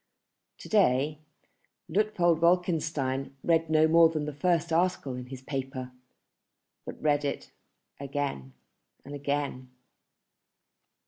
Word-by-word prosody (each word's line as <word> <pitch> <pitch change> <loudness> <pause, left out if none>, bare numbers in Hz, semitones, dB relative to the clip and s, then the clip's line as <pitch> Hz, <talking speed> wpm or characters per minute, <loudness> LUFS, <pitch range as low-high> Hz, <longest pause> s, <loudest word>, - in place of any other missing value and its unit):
To - - -11
day 150 -7 +2 0.7
Luitpold 180 -6 +2
Wolkenstein 155 -6 0
read 165 -1 +2
no 155 0 +4
more 165 0 +6
than 155 -2 -3
the 150 - -5
first 170 +1 0
article 170 -5 +1
in 125 0 -7
his 130 0 -9
paper, 130 -2 -5 1.0
but - - -7
read 145 -1 +1
it 140 - -4 0.5
again 140 - -4 0.5
and 140 - -9
again. 140 -2 -3
150 Hz, 110 wpm, -28 LUFS, 135-165 Hz, 1.0 s, more